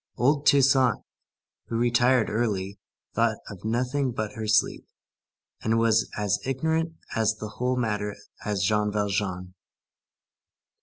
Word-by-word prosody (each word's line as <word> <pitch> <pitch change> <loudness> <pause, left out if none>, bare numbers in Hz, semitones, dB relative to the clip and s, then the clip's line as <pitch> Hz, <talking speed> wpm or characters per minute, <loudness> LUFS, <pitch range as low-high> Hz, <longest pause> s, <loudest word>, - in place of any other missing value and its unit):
Old 140 +3 +2
Toussaint, 135 -4 +5 0.7
who 115 - -2
retired 120 0 +3
early, 100 -3 -1 0.3
thought - - +1
of 100 - -11
nothing 125 +4 0
but 110 -2 -3
her 110 -1 -5
sleep, 105 0 +1 0.7
and 110 +1 +1
was 115 -1 +3
as 105 -2 0
ignorant 160 +5 -1 0.2
of 110 -1 +1
the 105 - -6
whole 125 +1 +1
matter 105 -3 -1 0.3
as 100 -2 -1
Jean 105 +1 +1
Valjean. 100 -3 -2
110 Hz, 120 wpm, -26 LUFS, 105-125 Hz, 0.7 s, Toussaint